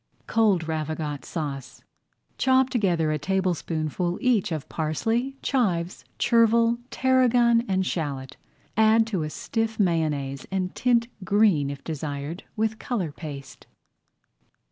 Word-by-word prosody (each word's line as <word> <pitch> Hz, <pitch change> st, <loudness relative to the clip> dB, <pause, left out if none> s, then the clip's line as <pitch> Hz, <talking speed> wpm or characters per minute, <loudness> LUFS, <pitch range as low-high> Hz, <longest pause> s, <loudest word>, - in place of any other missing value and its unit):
COLD 205 Hz, -8 st, +2 dB
RAVIGOTE 155 Hz, -2 st, -3 dB
SAUCE 140 Hz, -6 st, -6 dB, 0.6 s
Chop 260 Hz, 0 st, +3 dB
together 175 Hz, -, +1 dB
a 155 Hz, -, -1 dB
tablespoonful 175 Hz, -1 st, -1 dB
each 230 Hz, -7 st, +2 dB
of 155 Hz, -3 st, -3 dB
parsley, 225 Hz, -, -1 dB
chives, 185 Hz, -10 st, 0 dB
chervil, 230 Hz, 0 st, +3 dB
tarragon, 245 Hz, -3 st, +3 dB
and 190 Hz, -1 st, +1 dB
shallot. 145 Hz, -6 st, -3 dB, 0.4 s
Add 220 Hz, +1 st, +5 dB
to 205 Hz, -6 st, -2 dB
a 155 Hz, -, -2 dB
stiff 225 Hz, +7 st, -3 dB
mayonnaise 150 Hz, -7 st, 0 dB
and 185 Hz, -1 st, -2 dB
tint 235 Hz, -2 st, +2 dB, 0.2 s
green, 195 Hz, -8 st, +3 dB
if 140 Hz, -1 st, -7 dB
desired, 150 Hz, +2 st, -5 dB
with 220 Hz, 0 st, -1 dB
color 195 Hz, -, -2 dB
paste. 140 Hz, -3 st, -9 dB
185 Hz, 115 wpm, -25 LUFS, 155-225 Hz, 0.6 s, Add